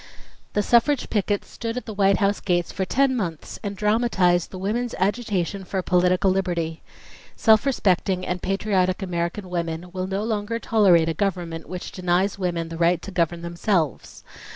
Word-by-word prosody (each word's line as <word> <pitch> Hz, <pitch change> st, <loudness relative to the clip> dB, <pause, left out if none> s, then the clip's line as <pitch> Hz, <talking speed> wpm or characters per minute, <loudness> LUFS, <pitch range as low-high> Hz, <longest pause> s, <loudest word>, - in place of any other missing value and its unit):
"The 205 Hz, -, +1 dB
suffrage 245 Hz, +5 st, +2 dB
pickets 205 Hz, -1 st, 0 dB
stood 230 Hz, +1 st, -5 dB
at 250 Hz, -, -4 dB
the 220 Hz, -, -6 dB
White 195 Hz, -1 st, +3 dB
House 200 Hz, -1 st, +1 dB
gates 175 Hz, -3 st, 0 dB
for 190 Hz, -, -2 dB
ten 270 Hz, +6 st, +2 dB
months 170 Hz, -9 st, -4 dB
and 200 Hz, -2 st, -5 dB
dramatized 210 Hz, -5 st, +2 dB
the 185 Hz, -, -8 dB
women's 225 Hz, +6 st, -2 dB
agitation 200 Hz, -2 st, -1 dB
for 190 Hz, +1 st, -3 dB
political 180 Hz, +2 st, +3 dB
liberty. 170 Hz, -4 st, -1 dB, 0.5 s
Self 220 Hz, +4 st, +4 dB
respecting 190 Hz, -6 st, +1 dB
and 180 Hz, 0 st, -3 dB
patriotic 195 Hz, -1 st, 0 dB
American 175 Hz, +2 st, -3 dB
women 170 Hz, 0 st, -3 dB
will 185 Hz, 0 st, -3 dB
no 195 Hz, +2 st, -2 dB
longer 220 Hz, 0 st, -2 dB
tolerate 195 Hz, -8 st, +4 dB
a 165 Hz, -, 0 dB
government 175 Hz, -3 st, -3 dB
which 180 Hz, -1 st, -6 dB
denies 185 Hz, +2 st, 0 dB
women 170 Hz, -3 st, -2 dB
the 165 Hz, -, -6 dB
right 170 Hz, 0 st, +3 dB
to 200 Hz, -, -7 dB
govern 170 Hz, -1 st, 0 dB
themselves. 170 Hz, -2 st, -2 dB
190 Hz, 165 wpm, -23 LUFS, 175-210 Hz, 0.5 s, Self